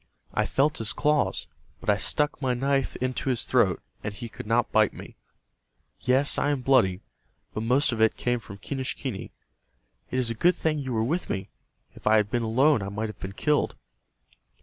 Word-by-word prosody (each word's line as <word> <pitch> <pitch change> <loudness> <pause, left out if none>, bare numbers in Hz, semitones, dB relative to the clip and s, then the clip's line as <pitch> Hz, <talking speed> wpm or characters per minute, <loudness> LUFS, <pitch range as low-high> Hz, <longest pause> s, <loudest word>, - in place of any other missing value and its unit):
"I - - +1
felt 145 +2 +1
his 110 -1 -2
claws, 150 0 +1 0.3
but - - -13
I - - +4
stuck 150 -1 +1
my 130 -2 +1
knife 135 +1 0
into 130 +1 -2
his 120 -3 +1
throat, - - +2 0.2
and 105 - -2
he 115 +3 -7
could 105 - -9
not 115 +1 +2
bite 110 -2 +3
me. - - -10 0.8
Yes, 130 +3 +2
I 145 - +1
am 145 -3 0
bloody, 115 -8 +3 0.5
but 110 - -3
most 125 +6 +3
of 115 -2 -2
it 110 - +4
came 120 0 0
from 100 -3 -10
Quenischquney. 130 -1 -4 0.8
It 130 - -2
is 125 -3 +1
a - - 0
good 175 +10 +3
thing 155 -2 0
you 135 -2 -4
were 110 -1 +1
with 165 +10 -1
me. 95 -1 -3 0.4
If - - -8
I 110 - +6
had 105 -1 +2
been 120 - +1
alone 130 +4 +3
I 100 - -4
might 105 +2 -3
have 105 - -10
been 95 0 -6
killed." 150 +7 +1
125 Hz, 195 wpm, -26 LUFS, 110-140 Hz, 0.8 s, I